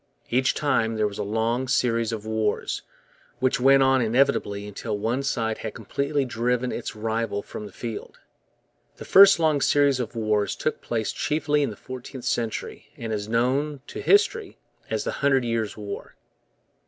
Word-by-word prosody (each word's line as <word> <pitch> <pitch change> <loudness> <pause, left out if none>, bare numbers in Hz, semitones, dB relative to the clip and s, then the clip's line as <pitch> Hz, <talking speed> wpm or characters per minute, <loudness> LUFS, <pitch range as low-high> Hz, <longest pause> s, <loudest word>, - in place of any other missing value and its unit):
Each 130 +2 +2
time 115 -6 +1
there 110 -1 +1
was 105 0 -7
a - - 0
long 115 +5 -1
series 115 -3 +1
of 110 -2 -5
wars, 110 -1 -1 0.6
which 130 0 +1
went 135 +1 +6
on 130 -1 +4
inevitably 110 -4 +1
until 105 +1 -4
one 115 +6 -1
side 115 -5 -1
had 110 - -6
completely 140 0 -1
driven 125 +1 -1
its 120 - -5
rival 110 -1 -2
from 105 - -8
the - - -13
field. 115 +3 -7 0.8
The - - -9
first 195 +1 +8
long 155 -3 +2
series 140 -2 +3
of 120 -1 -4
wars 105 -2 0
took 155 - -2
place 110 -2 -2
chiefly 150 -1 0
in 140 - +1
the 105 - -7
fourteenth 130 +2 -9
century 115 -2 -3
and 115 -1 -4
is 105 0 -3
known 130 +5 0
to - - -7
history 430 +2 +2 0.3
as - - -1
the - - -2
Hundred 135 -3 +3
Years' 115 -3 -2
War. 100 -1 -7
120 Hz, 165 wpm, -25 LUFS, 110-135 Hz, 0.8 s, first